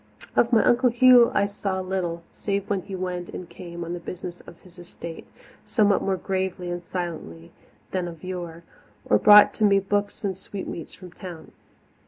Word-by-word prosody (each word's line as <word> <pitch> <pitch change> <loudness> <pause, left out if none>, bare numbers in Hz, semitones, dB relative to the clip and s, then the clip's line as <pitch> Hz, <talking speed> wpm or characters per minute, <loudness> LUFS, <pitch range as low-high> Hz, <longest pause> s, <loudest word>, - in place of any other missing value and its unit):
Of 235 - +3
my 225 -2 +5
Uncle 250 +1 +4
Hugh 245 0 +6
I 200 - +3
saw 200 -1 -3
little, 185 -3 -3
save 200 0 -3
when 195 -2 +1
he 195 +2 -7
went 180 -1 -4
and 180 - -7
came 170 -1 -8
on 170 - -5
the 175 - -4
business 180 0 -7
of 170 - -13
his 180 -1 -17
estate, 170 -1 -9 0.4
somewhat 205 -4 +2
more 195 -1 0
gravely 185 -1 -3
and 175 0 -4
silently 165 - -6 0.4
than 185 -2 -1
of 165 -2 -10
yore, 175 -2 -6 0.4
or - - +3
brought 210 -1 +8
to 220 - -2
me 200 -1 +5
books 205 +2 -2
and 195 -2 -1
sweetmeats 190 -3 -7
from 180 -2 -12
town. 175 -3 -10
185 Hz, 180 wpm, -25 LUFS, 175-200 Hz, 0.4 s, brought